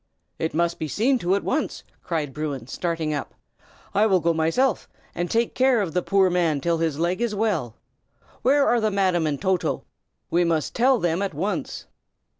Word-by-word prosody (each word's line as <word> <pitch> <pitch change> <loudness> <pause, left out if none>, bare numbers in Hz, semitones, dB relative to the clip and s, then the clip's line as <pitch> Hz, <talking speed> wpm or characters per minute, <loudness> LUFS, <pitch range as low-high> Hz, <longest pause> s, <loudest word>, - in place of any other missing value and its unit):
"It 160 -1 -2
must 170 +1 0
be 155 - -2
seen 240 - +1
to 180 0 +1
at 200 - -2
once!" 310 - -2 0.2
cried 155 -5 -3
Bruin, 145 -5 -4
starting 165 +2 -2
up. 145 - -5 0.6
"I 210 +2 +4
will 190 -3 +3
go 170 0 +1
myself, 165 +12 +1 0.2
and 175 0 -3
take 230 0 +1
care 260 -2 +3
of 185 -7 -2
the 180 - +1
poor 195 +1 +3
man 170 -5 +1
till 165 +3 0
his 160 -3 0
leg 175 +6 0
is 235 -3 0
well. 190 - -1 0.7
Where 275 +2 +4
are 240 -1 +3
the 215 - +2
Madam 185 -5 +1
and 145 -2 -2
Toto? 185 -2 0 0.5
We 175 +1 +3
must 165 -3 0
tell 255 +2 +4
them 175 -3 0
at 200 - -2
once." 205 +2 -3
175 Hz, 190 wpm, -24 LUFS, 160-215 Hz, 0.7 s, I